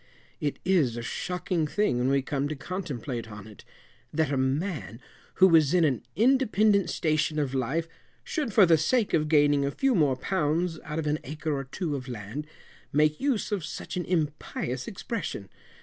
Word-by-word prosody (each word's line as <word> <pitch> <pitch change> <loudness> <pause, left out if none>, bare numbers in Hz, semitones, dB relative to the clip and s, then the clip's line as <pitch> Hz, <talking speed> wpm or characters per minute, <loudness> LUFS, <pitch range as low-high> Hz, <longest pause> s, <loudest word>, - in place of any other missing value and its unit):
It 145 -2 -2
is 155 -11 +2
a 120 - -4
shocking 175 +3 -2
thing 205 -7 +1
when 125 +2 +1
we 135 0 +2
come 140 0 -1
to 155 - -4
contemplate 135 - -5
on 105 -1 -9
it, 110 -1 -13 0.5
that 155 -2 0
a - - +1
man, 130 - -2 0.4
who 190 - +7
was 165 -2 +5
in 175 - +4
an 130 -6 +1
independant 215 -6 +3
station 155 -1 0
of 140 -3 -1
life, 135 +6 -1 0.4
should, 300 -8 -2
for 200 -1 +6
the 165 -2 +4
sake 220 +7 +1
of 155 -1 +2
gaining 145 -2 +4
a 140 - +1
few 270 - +1
more 150 - +3
pounds 165 +2 -1
out 150 +1 -4
of 160 - -2
an 150 +1 0
acre 155 +2 -3
or 135 -1 -3
two 150 +2 -3
of 130 -1 -6
land, 120 +5 -6 0.4
make 150 +1 +2
use 265 -7 0
of 200 -5 -1
such 160 - -6
an 180 - -2
impious 150 -6 -2
expression. 190 - -5
150 Hz, 180 wpm, -27 LUFS, 135-180 Hz, 0.5 s, who